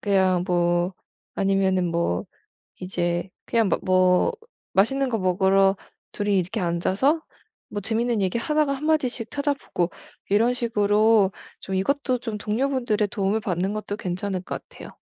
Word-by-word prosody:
그냥 190 Hz, -3 st, +2 dB
뭐 175 Hz, 0 st, +1 dB, 0.4 s
아니면은 190 Hz, -2 st, +1 dB
뭐 170 Hz, -, 0 dB, 0.6 s
이제 175 Hz, 0 st, -2 dB, 0.2 s
그냥 225 Hz, -4 st, +2 dB
막 -, -, +1 dB
뭐 185 Hz, -, +3 dB, 0.4 s
맛있는 270 Hz, +8 st, +2 dB
거 225 Hz, -, 0 dB
먹으러 190 Hz, +1 st, +3 dB, 0.3 s
둘이 205 Hz, -1 st, 0 dB
이렇게 180 Hz, 0 st, -3 dB
앉아서 190 Hz, -, +1 dB, 0.5 s
뭐 205 Hz, -, -4 dB
재밌는 225 Hz, +1 st, 0 dB
얘기 190 Hz, +4 st, 0 dB
하다가 300 Hz, +3 st, +1 dB
1 280 Hz, +3 st, -5 dB
마디씩 255 Hz, -7 st, 0 dB
찾아보고 285 Hz, -, -1 dB, 0.4 s
이런 225 Hz, +5 st, +3 dB
식으로 215 Hz, -3 st, +3 dB, 0.3 s
좀 190 Hz, -, -4 dB
이것도 255 Hz, +6 st, 0 dB
좀 225 Hz, -3 st, -4 dB
동료분들의 225 Hz, -1 st, 0 dB
도움을 200 Hz, +1 st, 0 dB
받는 190 Hz, -2 st, -1 dB
것도 210 Hz, -1 st, -4 dB
괜찮을 185 Hz, +1 st, -3 dB
것 -, -, -6 dB
같아요. -, -, -11 dB
200 Hz, 295 characters per minute, -24 LUFS, 185-235 Hz, 0.6 s, 뭐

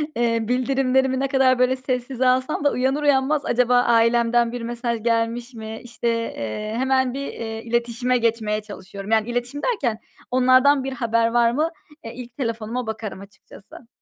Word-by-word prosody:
eee, 230 Hz, -1 st, +1 dB
bildirimlerimi 260 Hz, +1 st, +1 dB
ne 275 Hz, -, 0 dB
kadar 260 Hz, -2 st, +3 dB
böyle 255 Hz, +1 st, +3 dB
sessize 255 Hz, 0 st, -2 dB
alsam 260 Hz, +4 st, +1 dB
da 285 Hz, -, +3 dB
uyanır 265 Hz, +4 st, 0 dB
uyanmaz, 285 Hz, +1 st, +2 dB
acaba 245 Hz, 0 st, +2 dB
ailemden 235 Hz, 0 st, +3 dB
bir 245 Hz, -1 st, -5 dB
mesaj 235 Hz, -1 st, -3 dB
gelmiş 235 Hz, +1 st, -1 dB
mi, 220 Hz, 0 st, -7 dB
işte, 235 Hz, 0 st, -5 dB
eee, 215 Hz, -, -3 dB
hemen 260 Hz, -1 st, +1 dB
bir, 275 Hz, +1 st, -4 dB
eee, 225 Hz, -1 st, -6 dB
iletişime 240 Hz, +2 st, 0 dB
geçmeye 220 Hz, -2 st, 0 dB
çalışıyorum. 200 Hz, 0 st, -9 dB
Yani 220 Hz, +1 st, +2 dB
iletişim 245 Hz, +4 st, -3 dB
derken 260 Hz, -, 0 dB, 0.3 s
onlardan 255 Hz, +2 st, +4 dB
bir 270 Hz, 0 st, -4 dB
haber 230 Hz, -2 st, +1 dB
var 235 Hz, 0 st, +3 dB
mı? 310 Hz, +6 st, 0 dB, 0.3 s
E, 225 Hz, -, -7 dB
ilk 245 Hz, 0 st, -10 dB
telefonuma 230 Hz, -1 st, -3 dB
bakarım 220 Hz, -3 st, -5 dB
açıkçası. 200 Hz, +3 st, -15 dB
240 Hz, 160 wpm, -22 LUFS, 230-260 Hz, 0.3 s, onlardan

